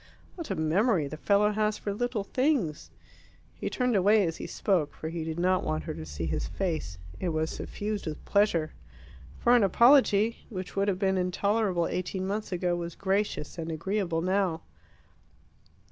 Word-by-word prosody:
"What 335 -3 -7
a - - -1
memory 165 - +2
the 155 - -6
fellow 205 +6 +3
has 215 0 0
for 200 - -3
little 240 -1 -2
things!" 250 - 0 0.6
He - - -4
turned 250 -2 0
away 205 +1 +4
as 165 -1 -3
he - - -6
spoke, 180 -8 0
for 160 - -5
he 165 0 -4
did 160 0 -4
not 185 +1 +2
want 80 0 -2
her - - -4
to 80 -1 -8
see 75 +1 -4
his 80 - -2
face. 160 - -3 0.2
It 180 - -1
was 160 0 -1
suffused 210 -3 -4
with 155 -1 -6
pleasure. 185 -7 +2 0.7
For 240 +1 +4
an 240 - +5
apology, 230 +1 +4
which 185 -4 -6
would 200 0 +1
have 195 -3 +1
been 190 -1 +1
intolerable 185 0 +1
eighteen 185 +2 -3
months 210 +2 -3
ago, 180 -1 0
was 170 -1 -5
gracious 195 -4 -1
and 165 0 -3
agreeable 175 0 -1
now. 185 -3 0
190 Hz, 175 wpm, -28 LUFS, 165-210 Hz, 0.7 s, an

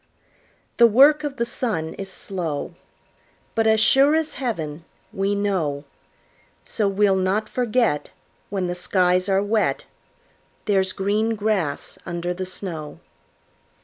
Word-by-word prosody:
The 235 - +8
work 285 +7 +5
of 285 -2 -4
the 235 - 0
sun 215 -10 -2
is 195 -1 -7
slow, 175 -8 -4 0.8
But 225 -1 +1
as 220 0 +4
sure 275 +7 +5
as 320 -1 -1
heaven, 165 - -3 0.3
we 195 +1 0
know; 180 -9 -1 0.8
So 210 -3 -1
we'll 195 0 +2
not 190 +3 0
forget, 235 -10 0 0.4
When 190 -2 -2
the 175 - -2
skies 180 +1 +1
are 195 0 +2
wet, 210 +1 0 0.8
There's 190 -3 +2
green 210 +3 0
grass 205 -8 -2
under 175 0 -3
the 185 +1 -5
snow. 170 -5 -7
195 Hz, 125 wpm, -23 LUFS, 180-225 Hz, 0.8 s, The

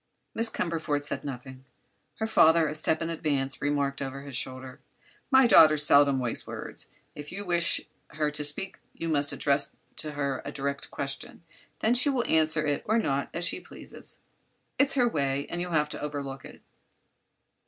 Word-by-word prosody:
Miss 230 0 +2
Cumberford 160 -6 -2
said - - -4
nothing. 130 -1 -8 0.5
Her 220 - -2
father, 165 -7 +5
a 150 - -3
step 155 +1 0
in 165 - -3
advance, 140 -4 -1
remarked 140 -1 -1
over 135 0 -5
his 140 -2 -7
shoulder: 130 0 -5 0.5
"My 265 -1 +6
daughter 155 -9 +7
seldom 145 -1 +5
wastes 125 -3 -1
words. - - -6 0.2
If 145 0 -9
you 200 +3 -6
wish 170 -2 +2 0.3
her 150 0 -1
to 150 0 -3
speak 150 +6 +1 0.2
you 165 - -4
must 145 -2 +1
address 140 0 0 0.2
to 150 -1 -4
her 140 -2 -2
a 140 - -6
direct 140 -1 -3
question; 140 +4 -5 0.4
then 220 - +3
she 250 +4 +5
will 255 -4 0
answer 155 -1 +3
it 145 -1 0
or 220 +2 +3
not, 140 -10 0
as 170 +1 -3
she 170 - -1
pleases. - - -11 0.6
It's 280 0 +4
her 250 -3 +4
way, 140 - 0
and 175 - -3
you'll 180 -1 -4
have 150 -1 +2
to - - -6
overlook 140 -2 -5
it." - - -13
150 Hz, 175 wpm, -28 LUFS, 140-170 Hz, 0.6 s, daughter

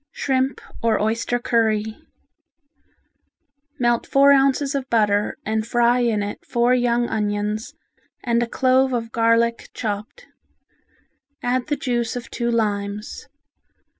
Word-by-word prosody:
Shrimp 265 -1 -1 0.2
or 225 -2 +2
Oyster 230 +3 0
Curry 220 -2 0 1.8
Melt 240 -1 +1
four 275 +1 +5
ounces 275 0 +3
of 275 -1 -3
butter 210 -2 +1
and 220 +1 -1
fry 240 +1 +3
in 225 -4 +1
it 205 - -6
four 240 +1 +1
young 240 -1 +1
onions 210 0 -2 0.5
and 235 -1 +1
a 240 - 0
clove 260 +2 +2
of 230 -2 -3
garlic 230 0 +1
chopped. 215 - -5 1.2
Add 245 0 0
the 295 - 0
juice 240 -4 -2
of 245 -1 -7
two 235 -1 -2
limes. 210 -2 -2
235 Hz, 120 wpm, -22 LUFS, 220-250 Hz, 1.8 s, four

